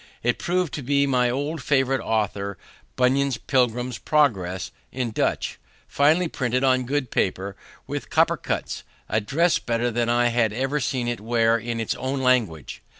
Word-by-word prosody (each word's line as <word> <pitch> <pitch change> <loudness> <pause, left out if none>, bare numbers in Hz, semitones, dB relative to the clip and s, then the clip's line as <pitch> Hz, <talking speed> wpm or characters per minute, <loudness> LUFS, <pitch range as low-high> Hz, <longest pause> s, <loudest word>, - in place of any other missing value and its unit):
It 120 +1 +1
proved 180 -3 0
to 145 - -3
be 140 +2 +2
my 125 -3 +2
old 145 +5 -2
favorite 135 -1 +1
author, 100 -3 -1 0.4
Bunyan's 130 0 +2
Pilgrim's 125 -1 0
Progress, 95 - +1 0.2
in 125 -3 -2
Dutch, - - -1 0.3
finely 155 +5 +3
printed 125 -3 -1
on 130 -2 +2
good 140 -3 -1
paper, 95 +1 -1 0.3
with - - -5
copper - - +3
cuts, - - -3 0.3
a 110 +2 +1
dress 165 +11 +2
better 120 +1 -1
than 120 +1 0
I 120 0 +3
had 115 -3 +1
ever 135 +5 -1
seen 125 -2 -1
it 120 0 -2
wear 115 0 +2
in 115 0 -3
its 115 - -1
own 130 +2 -3
language. 115 - 0
125 Hz, 160 wpm, -24 LUFS, 115-135 Hz, 0.4 s, finely